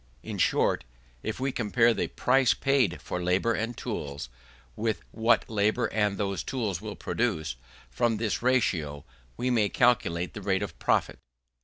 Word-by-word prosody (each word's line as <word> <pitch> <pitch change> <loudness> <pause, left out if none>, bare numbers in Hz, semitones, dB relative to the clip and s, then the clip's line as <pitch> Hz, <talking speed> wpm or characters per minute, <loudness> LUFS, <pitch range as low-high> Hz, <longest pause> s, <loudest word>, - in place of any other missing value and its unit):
In - - -5
short, - - +2 0.4
if 110 - -4
we 135 +1 0
compare 115 0 +3
the - - -1
price 130 -1 +3
paid 130 -10 +2
for 90 - -4
labour 90 +6 +2
and 115 +2 -3
tools 70 - -5 0.5
with 110 0 -1
what 115 0 +3
that - - -18
labour 105 0 +2
and 105 -2 +1
those 100 -2 -1
tools 105 -9 -2
will 105 -1 -6
produce, 85 - -1 0.4
from 120 -2 +1
this 110 -1 -1
ratio 85 - +1 0.3
we 125 +1 0
may 110 -4 +3
calculate 110 -8 +2
the 105 - -7
rate 95 0 0
of 105 - -7
profit. - - +1
110 Hz, 160 wpm, -28 LUFS, 95-120 Hz, 0.5 s, compare